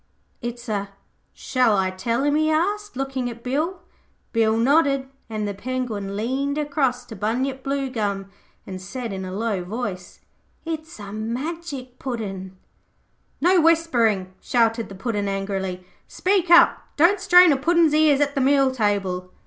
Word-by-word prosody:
'It's 240 0 -6
a 200 -2 -2 0.4
Shall 250 -5 +1
I 190 -1 +1
tell 230 +7 -1
him?' 290 0 +2
he 310 +1 +2
asked, 405 +6 0
looking 265 -2 -2
at 235 0 -10
Bill. 310 +8 -2 0.5
Bill 225 -1 +2
nodded, 275 +2 +3 0.2
and 215 -1 -3
the 205 - -3
Penguin 215 -3 -4
leaned 270 +6 -1
across 280 -4 0
to 230 - -9
Bunyip 255 +6 -2
Bluegum 225 -8 -2 0.3
and 185 -1 -7
said 230 +3 -5
in 190 0 -5
a 185 - -6
low 205 -1 -2
voice, 190 -2 -5 0.5
'It's 320 -4 -6
a 205 -1 -8
Magic 255 +3 -5
Puddin'.' 195 -7 -5 0.8
'No 355 +2 +5
whispering,' 235 - +2
shouted 230 -1 +1
the 195 - -9
Puddin' 205 0 -2
angrily. 195 -2 -3 0.2
'Speak 370 -2 0
up. 345 0 +6 0.2
Don't 350 +6 +4
strain 355 -1 +7
a - - +4
Puddin's 330 +2 +3
ears 300 -2 +4
at 285 -1 +1
the 275 - 0
meal 275 0 +4
table.' 200 -6 -1
245 Hz, 150 wpm, -23 LUFS, 205-290 Hz, 0.8 s, strain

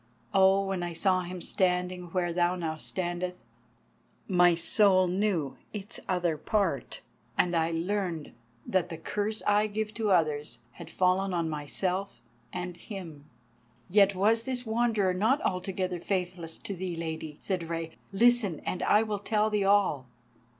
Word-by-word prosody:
Oh, 195 0 +5
when 195 -2 -2
I 175 -1 -3
saw 185 +2 +2
him 180 0 -6
standing 180 -1 0
where 175 0 -1
now 175 +1 +2
thou 160 -2 -3
standest, 180 +1 -4 0.8
my 175 -2 +5
soul 185 +2 +4
knew 180 -6 0 0.2
its 210 +2 -5
other 175 -4 +1
part, 205 +5 -1 0.4
and 175 -1 +2
I 165 0 +2
learned 170 -1 -2 0.3
that 185 -2 0
the 165 - -6
curse 210 +6 -2
I 205 +1 +3
give 215 +1 -3
to 220 -2 -1
others 150 -8 +1
had - - -11
fallen 185 +1 +1
on 165 -2 -1
myself 180 +4 -2 0.3
and 180 -1 -5
him." 170 -8 -9 0.7
"Yet 200 0 +5
was 215 +4 +3
this 250 0 -3
Wanderer 220 -4 +1
not 220 +10 +2
altogether 185 -1 -2
faithless 180 -3 -3
to 200 - -5
thee, 180 -1 -4
Lady," 160 -2 -5
said 180 -4 -3
Rei. 165 -1 -3 0.2
"Listen, 215 -5 +3
and 180 - -2
I 210 - +4
will 210 -2 -3
tell 215 +1 +1
thee 205 -2 +1
all." 195 -10 +3
185 Hz, 150 wpm, -29 LUFS, 170-205 Hz, 0.8 s, Oh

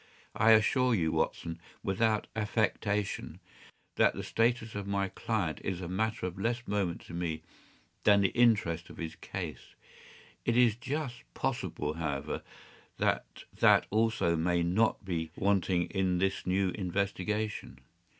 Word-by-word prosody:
” - - -33
“I - - +10
assure 125 +3 +4
you, 80 -5 +1
Watson, 85 0 -1 0.2
without 105 +2 +1
affectation, 105 -1 -1 0.6
that - - +4
the - - -4
status 115 -1 +1
of 100 -1 -4
my 100 -1 0
client 100 -9 -2
is 95 -3 -2
a 90 - -5
matter 110 +3 -1
of 90 +1 -5
less 120 +3 -1
moment 100 -4 -1
to - - -12
me 80 -2 -3 0.6
than 100 -1 +6
the 95 - +3
interest 105 -9 +2
of - - -12
his 80 -2 -4
case. - - -7 0.7
It 120 0 +1
is 120 -3 +5
just 135 0 -4
possible, 75 0 -2
however, 75 -3 -3 0.6
that - - -1 0.2
that - - +6
also 110 -5 +2
may 85 +1 +1
not 100 +4 +1
be 85 -4 -2
wanting 95 -3 +2
in 95 -2 +1
this 95 0 0
new 95 +1 +2
investigation. 100 - -2
100 Hz, 140 wpm, -31 LUFS, 85-110 Hz, 0.7 s, I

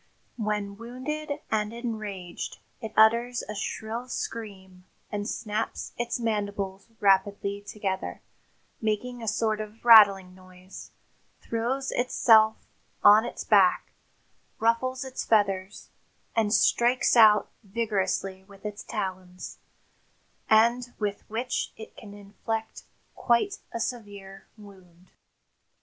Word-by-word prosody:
When 210 -2 -2
wounded 285 +6 -5
and 210 -1 0
enraged 215 -7 -6 0.2
it 220 - -6
utters 235 +3 +4
a 210 - -6
shrill 220 +4 -4
scream 190 -7 -6 0.3
and 205 +2 -3
snaps 215 0 -4
its 240 0 -2
mandibles 205 -3 -3
rapidly 200 0 +2
together, 200 -2 -4 0.6
making 230 +3 -2
a 225 - -6
sort 215 0 0
of 215 +2 -10
rattling 200 -5 +7
noise, 185 0 -13 0.5
throws 245 +4 -2
itself 220 -3 +4 0.4
on 210 +2 +7
its - - -6
back, - - +3 0.7
ruffles 255 +4 0
its 260 -1 -5
feathers 200 -2 0 0.5
and 220 -2 +2
strikes 240 +3 +3
out 215 -3 +6
vigorously 195 -3 -2
with 195 +1 -17
its 210 0 -5
talons, 185 -4 -6 0.9
and 235 +3 +3
with 205 -2 -4
which 240 +3 -2
it 220 - -11
can 205 -2 -11
inflict 220 +2 -6 0.3
quite 255 +12 +1
a 230 - -4
severe 205 -5 -6
wound." 185 -4 -17
215 Hz, 105 wpm, -27 LUFS, 200-235 Hz, 0.9 s, rattling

